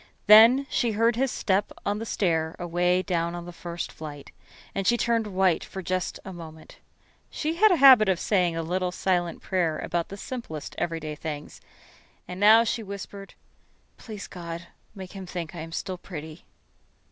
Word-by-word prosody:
Then 230 +6 +8
she 235 -5 0
heard 230 +2 +2
his 265 +3 +1
step 195 0 0
on 205 +1 -1
the 225 - -5
stair 160 -6 0
away 175 +1 +1
down 170 -1 -1
on 175 0 -7
the 175 - -9
first 170 0 -6
flight, 145 -3 -9 0.4
and 195 -1 -2
she 240 - +4
turned 230 -1 +1
white 185 -3 +1
for 190 - -8
just 185 0 -2
a 190 - -7
moment. 160 -2 -12 0.5
She 310 +1 -2
had 435 +4 +6
a - - +5
habit 260 - +8
of 185 -2 +1
saying 180 -5 +1
little 180 +2 -1
silent 180 -2 -1
prayers 175 -5 -1
about 170 -1 -2
the 200 - -8
simplest 200 - -7
everyday 165 -2 -3
things, 150 -1 -7 0.7
and 180 +1 -7
now 220 +3 +7
she 230 0 -2
whispered: 200 -1 -8 0.6
"Please, 215 -3 -8
God, 170 -2 -7 0.3
make 190 -2 -9
him 190 -2 -8
think 175 -3 -5
I 170 - -7
am 165 +1 -7
still 185 +2 -4
pretty." 160 -3 -9
185 Hz, 170 wpm, -26 LUFS, 170-210 Hz, 0.7 s, Then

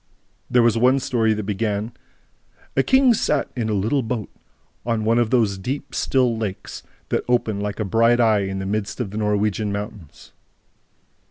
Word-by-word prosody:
There 125 -1 +4
was 115 -1 +3
one 130 +3 +4
story 115 -4 +1
that 105 - -4
began: 105 +2 -2 0.8
"A 135 - +4
king 260 - +4
sat - - 0
in 115 -3 -2
a - - 0
little 110 +8 +1
boat 115 -3 -4 0.5
on 115 -2 -1
one 115 +2 +3
of 120 -2 +1
those 110 -6 +1
deep, 135 +8 -5
still 125 -3 +1
lakes 105 -4 -5 0.3
that - - 0
open 115 -4 +1
like 105 +1 -4
a 110 - -1
bright 115 +4 +3
eye 110 -3 +4
in 95 0 -4
the 95 - -4
midst 100 +2 -3
of 110 -6 -3
the 105 - -6
Norwegian 105 0 0
mountains 100 -5 -8
110 Hz, 175 wpm, -22 LUFS, 105-120 Hz, 0.8 s, There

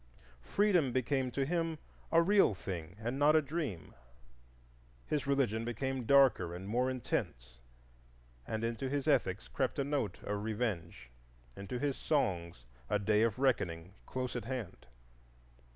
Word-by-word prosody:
Freedom 180 - +2
became 130 +1 0
to 135 +2 -1
him 165 +1 -1 0.3
a 165 0 +6
real 195 - +4
thing 90 -2 -6
and 120 +5 -3
not 150 +2 +5
a - - +7
dream. 140 - -4 1.1
His 145 -2 -1
religion 125 -6 +1
became 125 +1 -3
darker 130 -11 +5
and 95 +2 -7
more 125 +4 +1
intense, 60 - -3 0.9
and 110 0 -3
into 115 +3 -2
his 140 +1 -2
ethics 110 -10 +1
crept 130 -3 -1
a 140 - +1
note 135 -9 -1
of 105 0 -2
revenge, 95 - -3 0.4
into 100 +5 -5
his 140 +1 -1
songs 85 - -1 0.2
a 105 - +3
day 105 +1 +2
of 115 -2 +2
reckoning 95 -10 0
close 130 -1 -3
at 120 -3 -3
hand. 125 -6 -5
120 Hz, 140 wpm, -33 LUFS, 100-140 Hz, 1.1 s, a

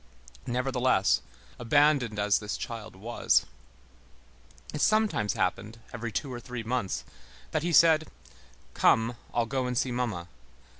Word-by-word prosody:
Nevertheless, 125 -4 +2 0.4
abandoned 130 -2 +3
as 105 0 +2
this 105 -1 -4
child 110 -3 -7
was, 115 +5 +1 1.3
it 150 - -3
sometimes 215 - +2
happened, 105 +5 -2 0.2
every 115 -1 -4
two 135 +3 -3
or 120 - -5
three 125 -1 -6
months, 110 - -2 0.5
that 155 - 0
he 175 +2 -1
said, 160 0 +5 0.7
"Come, 115 +2 +3 0.2
I'll 120 - +1
go 130 +1 -2
and 125 -1 -2
see 130 - +1
mamma!" 115 -9 -2
120 Hz, 130 wpm, -28 LUFS, 110-135 Hz, 1.3 s, said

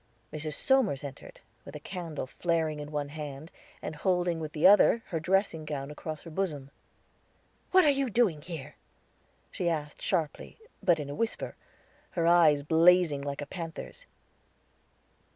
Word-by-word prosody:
Mrs. 155 -1 -2
Somers 250 - +2
entered, 140 -2 -9 0.2
with 140 - -11
a - - -5
candle 165 -3 -5
flaring 160 +1 -1
in 150 0 -7
one 145 -1 -2
hand, 150 +1 -7 0.3
and 155 - -4
holding 175 0 0
with 155 -2 -5
the 155 - 0
other 205 +3 +6
her 165 - -1
dressing 180 -1 +1
gown 145 -2 -5
across 155 +1 -7
her 165 - -10
bosom. 155 -6 -3 1.0
"What 370 -2 +6
are 295 - +6
you 275 -2 0
doing 205 -10 +2
here?" 160 -5 -8 0.7
she 175 - -1
asked 150 -3 -4
harshly, 165 -6 -2 0.2
but 175 -5 +3
in 145 -1 -5
a - - -4
whisper, 230 +9 -3 0.6
her 165 - +2
eyes 165 -4 +5
blazing 165 -1 +4
like 140 0 -4
a - - -4
panther's. 170 - -7
160 Hz, 150 wpm, -29 LUFS, 150-180 Hz, 1.0 s, other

